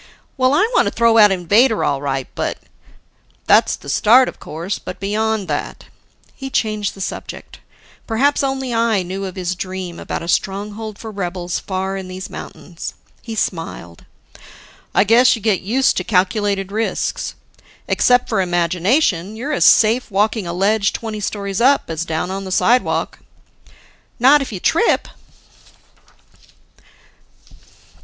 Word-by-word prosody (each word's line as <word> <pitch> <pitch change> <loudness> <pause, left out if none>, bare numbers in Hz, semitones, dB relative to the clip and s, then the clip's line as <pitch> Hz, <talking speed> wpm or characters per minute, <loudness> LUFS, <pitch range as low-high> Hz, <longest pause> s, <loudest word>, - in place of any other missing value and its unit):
"Well, 260 +1 +2
I 420 - +3
want - - +3
to - - 0
throw 230 -1 +3
out 210 -2 +7
Invader, 205 +6 +3
all 140 -1 0
right, 135 -2 -2
but - - -3 0.5
" - - -39
"That's - - +4
the - - -15
start, 235 - +5
of - - -7
course, 170 +6 -5
but - - -8
beyond 215 0 -1
that 145 -2 -4 0.3
" - - -39
He 270 -1 -7
changed 215 -5 -1
the 195 - -9
subject: - - -7 0.5
perhaps 265 +6 +2
only 265 -2 -2
I 230 -4 +1
knew 190 +2 -5
of 185 - -7
his 185 -1 -2
dream 185 -1 -6
about - - -5
a - - -7
stronghold 205 +3 -2
for 225 - -8
rebels 180 -3 -3
far 190 0 -3
in 190 -1 -6
these 185 0 -8
mountains. 170 -2 -8 0.3
He 225 -2 -7
smiled. 165 - -4 0.9
"I - - +5
guess 235 +4 +5
you 225 - -9
get 210 -4 +1
used 250 +8 +1
to - - 0
calculated 195 0 0
risks. 220 +2 -2 0.5
Except 245 0 +3
for 215 -4 0
imagination, 180 - +1
you're 270 +7 -4
as - - +2
safe 230 +3 +4
walking 210 0 0
a - - -3
ledge 200 +2 +1
twenty 220 -2 -5
stories 200 0 -3
up, 270 -7 +3
as 165 +1 -3
down 165 +2 -2
on 195 +1 -4
the 190 - -7
sidewalk." 245 +6 +1 1.0
"Not 275 +4 +5
if 270 - -5
you 195 - -5
trip." 335 - +2
205 Hz, 150 wpm, -19 LUFS, 185-230 Hz, 1.0 s, out